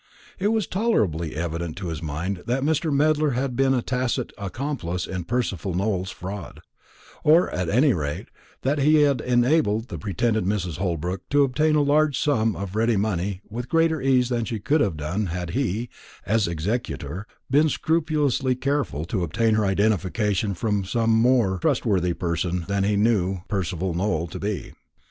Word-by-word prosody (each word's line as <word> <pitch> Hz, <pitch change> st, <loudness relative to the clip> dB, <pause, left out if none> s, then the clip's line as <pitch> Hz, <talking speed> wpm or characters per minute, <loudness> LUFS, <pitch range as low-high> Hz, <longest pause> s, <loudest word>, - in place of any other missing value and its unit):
It 195 Hz, -, +1 dB
was 220 Hz, -2 st, +1 dB
tolerably 100 Hz, -, 0 dB
evident 85 Hz, 0 st, -3 dB
to 90 Hz, -3 st, -4 dB
his 80 Hz, 0 st, -5 dB
mind 85 Hz, +5 st, -3 dB
that 130 Hz, +3 st, 0 dB
Mr. 155 Hz, +1 st, +1 dB
Medler 150 Hz, 0 st, +2 dB
had 130 Hz, -1 st, -1 dB
been 135 Hz, +1 st, +3 dB
a 120 Hz, -, 0 dB
tacit 125 Hz, -1 st, -1 dB
accomplice 100 Hz, -, -3 dB
in 95 Hz, -3 st, -5 dB
Percival 100 Hz, -7 st, -2 dB
Nowell's 95 Hz, -1 st, -1 dB
fraud; 95 Hz, +2 st, -7 dB, 0.6 s
or, 160 Hz, +4 st, +5 dB
at 90 Hz, -2 st, -2 dB
any 130 Hz, -, +4 dB
rate, 75 Hz, -4 st, -4 dB, 0.3 s
that 140 Hz, +3 st, +1 dB
he 150 Hz, +2 st, +5 dB
had 140 Hz, -5 st, +2 dB
enabled 120 Hz, -2 st, +2 dB
the -, -, -6 dB
pretended 110 Hz, +2 st, 0 dB
Mrs. 90 Hz, -4 st, -2 dB
Holbrook 90 Hz, 0 st, -3 dB
to 145 Hz, 0 st, +4 dB
obtain 150 Hz, +4 st, +2 dB
a 150 Hz, -, +4 dB
large 145 Hz, -1 st, +3 dB
sum 115 Hz, -7 st, +1 dB
of 100 Hz, 0 st, -5 dB
ready 115 Hz, 0 st, +2 dB
money 95 Hz, -2 st, -1 dB
with 120 Hz, +3 st, -6 dB
greater 165 Hz, -2 st, +2 dB
ease 130 Hz, -2 st, +3 dB
than 120 Hz, -2 st, 0 dB
she 115 Hz, 0 st, -3 dB
could 145 Hz, +9 st, +2 dB
have 95 Hz, -7 st, 0 dB
done 90 Hz, +8 st, -2 dB
had 90 Hz, 0 st, -4 dB
he, 120 Hz, -3 st, -1 dB, 0.4 s
as 110 Hz, -2 st, +2 dB
executor, 90 Hz, -, -3 dB, 0.2 s
been 150 Hz, +3 st, +4 dB
scrupulously 150 Hz, -5 st, +1 dB
careful 135 Hz, -, -1 dB
to 95 Hz, +2 st, -2 dB
obtain 110 Hz, +7 st, +1 dB
her 110 Hz, -1 st, +2 dB
identification 100 Hz, 0 st, +1 dB
from 105 Hz, +2 st, 0 dB
some 115 Hz, +4 st, 0 dB
more 115 Hz, -4 st, +3 dB
trustworthy 90 Hz, -1 st, +1 dB
person 85 Hz, 0 st, -2 dB
than 100 Hz, -1 st, 0 dB
he 105 Hz, +1 st, +2 dB
knew 100 Hz, -4 st, +1 dB
Percival 95 Hz, -3 st, -2 dB
Nowell 85 Hz, -2 st, 0 dB
to -, -, -7 dB
be. 100 Hz, -1 st, -4 dB
110 Hz, 165 wpm, -24 LUFS, 90-135 Hz, 0.6 s, or